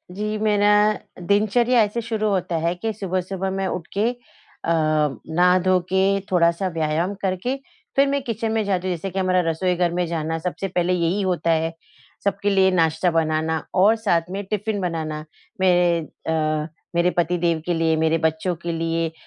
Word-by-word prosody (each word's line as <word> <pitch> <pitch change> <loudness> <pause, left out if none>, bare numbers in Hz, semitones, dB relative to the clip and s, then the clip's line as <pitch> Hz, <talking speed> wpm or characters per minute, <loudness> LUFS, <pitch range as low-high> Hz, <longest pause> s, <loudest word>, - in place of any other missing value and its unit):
जी, 210 +1 -2
मेरा 210 -1 +2 0.6
दिनचर्या 225 +4 +3
ऐसे 210 +3 -2
शुरू 220 -1 -2
होता 180 -3 -1
है 170 +2 0
कि 220 +5 -3
सुबह-सुबह 190 -1 -3
मैं 195 -1 -1
उठ 180 -2 -4
के 215 +3 +3 0.5
अ, - - -5
नहा 160 +3 +2
धो 185 -1 +4
के 190 +1 +2
थोड़ा-सा 170 +1 +2
व्यायाम 165 +3 -1
करके 190 +7 -1 0.4
फिर 275 +1 +4
मैं 280 0 0
किचन 225 -1 -2
में 220 -1 +1
जाती 185 -2 -1
हूँ। 180 - 0
जैसे 175 +4 -5
कि 190 +1 -3
हमारा 185 -1 +2
रसोई 180 +3 0
घर 175 -1 +1
में 180 0 0
जाना 160 -1 -2
सबसे 180 +3 -3
पहले 180 0 0
यही 175 +3 +1
होता 180 -3 0
है, 165 0 +1 0.5
सबके 200 0 0
लिए 190 -1 +4
नाश्ता 165 0 +2
बनाना 160 -1 0
और 195 +4 +5
साथ 205 -7 +1
में 200 +1 -3
टिफ़िन 210 +1 -2
बनाना 155 -3 -3 0.4
मेरे 175 -2 +4 0.3
अ, 155 -1 0 0.3
मेरे 170 +1 +3
पति 175 +1 +2
देव 165 -2 0
के 175 - 0
लिए, 165 -1 +2
मेरे 160 +1 +2
बच्चों 160 +2 0
के 170 - -2
लिए, 165 0 -1
180 Hz, 180 wpm, -22 LUFS, 165-200 Hz, 0.6 s, और